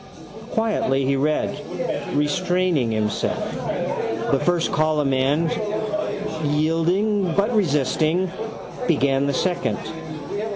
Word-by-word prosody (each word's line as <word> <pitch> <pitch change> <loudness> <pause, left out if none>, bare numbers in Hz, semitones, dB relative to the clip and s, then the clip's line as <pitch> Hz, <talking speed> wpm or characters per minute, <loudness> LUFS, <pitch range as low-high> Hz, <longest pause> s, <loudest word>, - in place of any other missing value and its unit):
Quietly 170 -12 +1
he 135 +1 +2
read, 150 +3 0 0.6
restraining 170 -2 +1
himself, 105 -2 -1 0.8
the 135 - +3
first 170 +3 +1
column 155 -3 +2
and, 145 +5 +2 0.9
yielding 165 +6 +1
but 210 +4 +2
resisting, 160 0 +2 0.6
began 140 -3 +2
the 140 - +1
second. 175 +2 0
155 Hz, 85 wpm, -23 LUFS, 140-180 Hz, 0.9 s, the